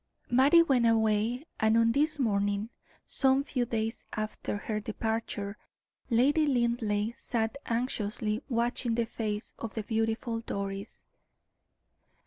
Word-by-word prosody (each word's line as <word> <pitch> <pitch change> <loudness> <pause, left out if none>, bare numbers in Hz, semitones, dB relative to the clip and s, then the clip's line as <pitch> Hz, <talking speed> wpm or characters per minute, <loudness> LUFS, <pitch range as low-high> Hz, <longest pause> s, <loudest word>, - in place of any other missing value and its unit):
Mattie 280 +7 +6
went 255 -7 +3
away, 225 +4 +2
and 220 +1 +4
on 230 0 +4
this 300 +4 +1
morning, 205 -3 0 0.3
some 265 0 +2
few 255 -3 -1
days 225 0 -2
after 215 -1 -3
her 210 +1 -3
departure, 220 -1 -3 0.5
Lady 285 +7 +4
Linleigh 235 -4 +1
sat 230 -3 -2
anxiously 225 -2 -1
watching 235 -1 0
the 235 0 +1
face 215 -1 -4
of 230 - -6
the 220 - -2
beautiful 225 +1 -1
Doris. 200 -2 -5
230 Hz, 115 wpm, -30 LUFS, 215-245 Hz, 0.5 s, Mattie